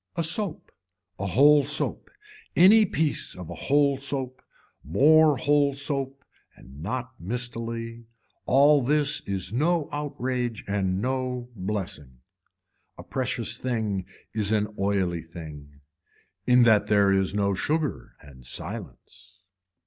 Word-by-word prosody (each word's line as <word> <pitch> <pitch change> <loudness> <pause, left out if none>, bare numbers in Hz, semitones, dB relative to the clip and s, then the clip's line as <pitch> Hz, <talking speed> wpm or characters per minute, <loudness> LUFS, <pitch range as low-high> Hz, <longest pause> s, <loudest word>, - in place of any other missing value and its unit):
A 170 - -1
soap, 165 +1 -2 0.5
a 100 - -2
whole 145 +8 +5
soap, 145 +2 -2 0.5
any 210 +5 +7
piece 155 -3 -1
of 90 -3 -9
a - - -4
whole 140 -1 +1
soap, 135 -2 -4 0.4
more 150 - +5
whole 145 +1 +2
soap 140 -1 -2 0.3
and 70 +3 -14
not 125 +7 -4
mistily, 115 +2 -5 0.4
all 145 +1 +5
this 150 +2 +1
is 95 0 -3
no 160 +4 +1
outrage 130 -5 -3
and 95 -1 -1
no 125 -1 -2
blessing. 95 - -5 0.8
A - - -9
precious - - -2
thing 110 -7 -2 0.3
is 105 -2 0
an 105 -1 0
oily 95 -4 0
thing. 75 -3 -11 0.7
In 125 0 +6
that 105 -3 +4
there 100 -2 +4
is 95 0 +1
no 100 -1 +1
sugar 150 - -2
and 70 -3 -15
silence. 95 - -9
115 Hz, 120 wpm, -26 LUFS, 95-140 Hz, 0.8 s, any